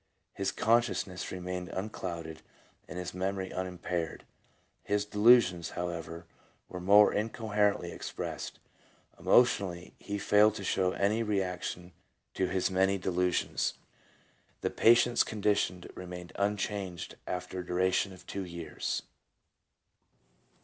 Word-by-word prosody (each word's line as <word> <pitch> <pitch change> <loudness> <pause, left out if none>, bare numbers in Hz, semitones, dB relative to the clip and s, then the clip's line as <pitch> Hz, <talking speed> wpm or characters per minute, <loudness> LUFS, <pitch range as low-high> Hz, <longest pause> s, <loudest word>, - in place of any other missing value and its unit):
His 95 - -1
consciousness 110 -5 +1
remained 90 0 -4
unclouded 85 -5 -5 0.5
and - - -7
his 90 0 -4
memory 95 +1 -2
unimpaired. 90 -2 -3 0.6
His 105 0 0
delusions, 105 -5 +5
however, 85 -1 -4 0.4
were 90 - -7
more 100 +3 +6
incoherently 105 -2 0
expressed. - - -5 0.6
Emotionally 95 -7 +3
he 100 0 -4
failed 105 +1 +4
to 100 - -6
show 95 -1 +1
any 105 +3 +1
reaction 90 -4 -2 0.4
to 95 - 0
his 95 +1 0
many 95 +1 +3
delusions. 90 -1 0 0.9
The - - -1
patient's 120 +1 +5
condition 100 -4 0
remained 90 -1 -8
unchanged 100 -3 -2
after 90 0 -4
a 90 - -5
dura 90 +1 +2
tion 95 +1 +1
of 95 - -13
two 100 - -4
years. 85 -2 -4
95 Hz, 110 wpm, -31 LUFS, 90-105 Hz, 0.9 s, more